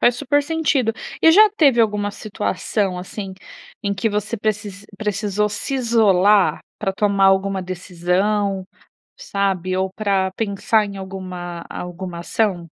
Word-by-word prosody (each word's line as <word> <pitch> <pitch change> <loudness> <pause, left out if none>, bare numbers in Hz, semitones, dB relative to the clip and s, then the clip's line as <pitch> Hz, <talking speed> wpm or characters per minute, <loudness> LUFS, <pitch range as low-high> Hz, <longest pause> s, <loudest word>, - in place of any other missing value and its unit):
Faz 240 0 +4
super 290 +2 +1
sentido. 290 -6 +1 0.3
E 325 - +8
já 425 +5 +8
teve 275 -7 +5
alguma 210 -2 +1
situação 200 -2 -2
assim, 190 +2 -6 0.5
em 200 -1 -1
que 200 +4 0
você 210 +2 -2
precis 205 -2 -3
precisou 210 0 0
se 210 +6 -4
isolar, 210 -5 +3 0.2
pra 195 -2 -1
tomar 200 -1 +2
alguma 195 0 +2
decisão, 185 +2 -1 0.5
sabe 190 -2 -1
ou 190 0 0
pra 195 -3 0
pensar 215 0 +1
em 200 -1 -8
alguma 185 -3 -7
alguma 180 0 -6
ação? 180 -1 -1
200 Hz, 130 wpm, -21 LUFS, 190-215 Hz, 0.5 s, E